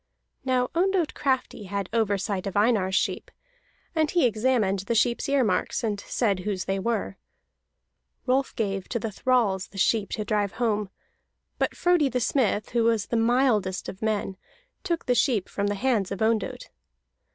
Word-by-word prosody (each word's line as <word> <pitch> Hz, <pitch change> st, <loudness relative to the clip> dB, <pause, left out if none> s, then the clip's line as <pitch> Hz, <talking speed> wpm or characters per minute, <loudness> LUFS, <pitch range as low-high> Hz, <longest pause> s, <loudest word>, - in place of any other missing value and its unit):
Now 255 Hz, -1 st, +1 dB
Ondott 360 Hz, -1 st, +1 dB
Crafty 260 Hz, -6 st, -1 dB
had 200 Hz, 0 st, -3 dB
oversight 200 Hz, -3 st, 0 dB
of 195 Hz, -, -3 dB
Einar's 205 Hz, -3 st, +2 dB
sheep, -, -, -1 dB, 0.6 s
and 315 Hz, -2 st, +1 dB
he 345 Hz, -5 st, +3 dB
examined 220 Hz, -3 st, +1 dB
the 200 Hz, +5 st, -2 dB
sheep's 235 Hz, +4 st, +1 dB
ear 280 Hz, -2 st, +3 dB
marks, 185 Hz, 0 st, 0 dB
and 210 Hz, -3 st, -1 dB
said 200 Hz, -2 st, 0 dB
whose 190 Hz, 0 st, -3 dB
they 195 Hz, 0 st, -1 dB
were. 200 Hz, -, -2 dB, 1.1 s
Rolf 265 Hz, +2 st, +1 dB
gave 195 Hz, -4 st, -2 dB
to 240 Hz, -, -1 dB
the 225 Hz, -1 st, -3 dB
thralls 205 Hz, -5 st, +1 dB
the 195 Hz, -, -14 dB
sheep 205 Hz, +1 st, +2 dB
to 215 Hz, -, -3 dB
drive 205 Hz, -1 st, 0 dB
home; 215 Hz, -4 st, -1 dB, 0.7 s
but -, -, 0 dB
Frodi 350 Hz, -5 st, +3 dB
the 250 Hz, 0 st, -1 dB
Smith, 235 Hz, -4 st, +1 dB
who 235 Hz, -1 st, +2 dB
was 225 Hz, -3 st, +2 dB
the -, -, -3 dB
mildest 225 Hz, -5 st, +2 dB
of 190 Hz, -, -8 dB
men, 210 Hz, -3 st, -1 dB, 0.5 s
took 340 Hz, -3 st, -2 dB
the 250 Hz, -, +2 dB
sheep 240 Hz, -, +1 dB
from 200 Hz, 0 st, -2 dB
the 205 Hz, -, -1 dB
hands 215 Hz, -4 st, 0 dB
of 195 Hz, -, -4 dB
Ondott. 225 Hz, -, -1 dB
220 Hz, 165 wpm, -26 LUFS, 200-255 Hz, 1.1 s, he